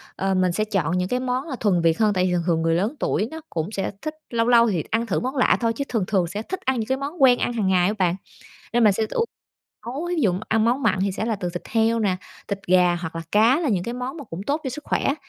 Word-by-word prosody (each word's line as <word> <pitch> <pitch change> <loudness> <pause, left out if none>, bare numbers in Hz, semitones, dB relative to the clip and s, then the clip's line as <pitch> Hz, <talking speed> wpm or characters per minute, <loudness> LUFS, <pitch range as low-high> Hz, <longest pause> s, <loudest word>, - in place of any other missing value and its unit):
Ờ, 195 0 0
mình 185 -1 +2
sẽ 215 +5 0
chọn 180 -5 0
những 180 0 0
cái 250 - 0
món 255 +4 -2
là 260 - -3
thuần 185 -6 +2
Việt 165 +2 +2
hơn, 210 -2 +3
tại 185 -1 +1
vì 180 - 0
thường 175 -1 0
thường 165 -1 +2
người 165 0 +2
lớn 210 - 0
tuổi 215 - 0
nó 320 0 -7
cũng 165 +5 -3
sẽ 195 -2 -2
thích 310 0 -4 0.2
lâu 230 0 0
lâu 235 -1 +5
thì 170 -6 -1
t - - -19
ăn 230 +1 +1
thử 200 - 0
món 260 +3 -3
lạ 255 - +3
thôi, 230 -1 +1
chứ 280 - -3
thường 225 -6 0
thường 185 -5 +1
sẽ 205 +5 -4
thích 375 - -5
ăn 260 -2 +1
những 220 - -3
cái 265 0 0
món 285 +3 -5
quen 250 -2 +6
ăn 240 - -1
hằng 210 -5 0
ngày 180 -1 +3
á 210 - 0
bạn. 180 -1 +2 0.6
Nên 240 -1 +3
mình 205 -2 +6
sẽ 220 +2 0
ưu 465 - 0 0.6
nấu, 290 +8 -4
thí 355 - -1
dụ 190 - +3 0.2
ăn 220 0 +2
món 250 +4 +1
mặn 195 -4 +2
thì 195 0 0
sẽ 215 - -3
là 225 -2 -1
từ 180 -2 -3
thịt 175 - -6
heo 225 0 +2
nè, 190 -4 +1 0.3
thịt 200 - -2
gà 180 -1 +4
hoặc 165 -1 -6
là 165 - -4
cá, 230 +9 +4
là 310 - 0
những 185 -5 0
cái 235 - -4
món 255 +4 -5
mà 290 - -8
cũng 175 -3 -7
tốt 295 +3 0
cho 260 - -2
sức 300 +4 -8
khỏe. 275 - 0
220 Hz, 305 wpm, -23 LUFS, 185-250 Hz, 0.6 s, quen